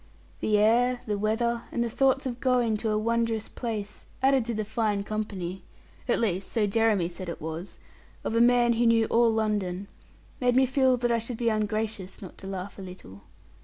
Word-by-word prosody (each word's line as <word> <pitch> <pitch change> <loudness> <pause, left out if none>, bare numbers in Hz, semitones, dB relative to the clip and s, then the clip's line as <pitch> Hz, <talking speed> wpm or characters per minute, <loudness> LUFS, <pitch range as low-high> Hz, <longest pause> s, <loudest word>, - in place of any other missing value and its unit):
The 210 -1 +2
air, 240 +4 +3
the 210 - -1
weather, 230 +3 0
and 235 - 0
the - - -1
thoughts 270 +3 +2
of 245 -2 -3
going 245 -4 +2
to 220 +1 -2
a 215 - +1
wondrous 230 0 0
place, 215 -4 -5 0.2
added 265 -3 +4
to 235 - -2
the 215 0 -2
fine 210 -2 0
company 195 -4 -4 0.5
at - - +2
least 195 -4 -1
so 220 -3 +2
Jeremy 210 -3 +2
said 175 +1 -7
it 170 - -5
was 160 +4 -6 0.5
of - - -2
a 230 - +3
man 240 0 +5
who 235 +1 +2
knew 230 -1 +4
all 235 0 +4
London, 205 -4 -1 0.5
made 245 -1 +2
me 265 +1 +5
feel 260 -1 +3
that 240 0 0
I 230 - +2
should 230 +1 -5
be 235 0 +1
ungracious 215 -2 -2
not 190 - -11
to 190 - -9
laugh 195 +1 -6
a - - -6
little. 180 - -11
220 Hz, 200 wpm, -27 LUFS, 200-235 Hz, 0.5 s, man